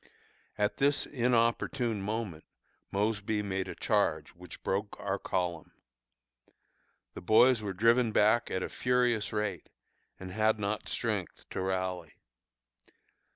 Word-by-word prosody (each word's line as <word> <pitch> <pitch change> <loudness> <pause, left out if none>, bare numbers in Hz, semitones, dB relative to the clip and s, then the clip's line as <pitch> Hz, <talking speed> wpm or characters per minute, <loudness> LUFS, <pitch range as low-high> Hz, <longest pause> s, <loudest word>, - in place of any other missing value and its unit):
At 105 0 0
this 140 +1 +2
inopportune 120 -2 +1
moment 105 -6 -4 0.5
Mosby 105 +1 -1
made 95 -1 -2
a - - -6
charge - - +1
which 90 0 -12
broke 100 +2 -2
our 100 0 -2
column. 90 -3 -3 1.4
The - - -8
boys 115 +6 +5
were 100 -2 -3
driven 115 +4 +3
back 110 +3 +3
at 95 - -2
a - - -4
furious 125 -3 +1
rate, 105 -1 -3 0.5
and 95 -1 -7
had 110 +2 +2
not 105 0 -3
strength - - -3
to - - -3
rally. 95 -3 -2
105 Hz, 120 wpm, -30 LUFS, 95-115 Hz, 1.4 s, boys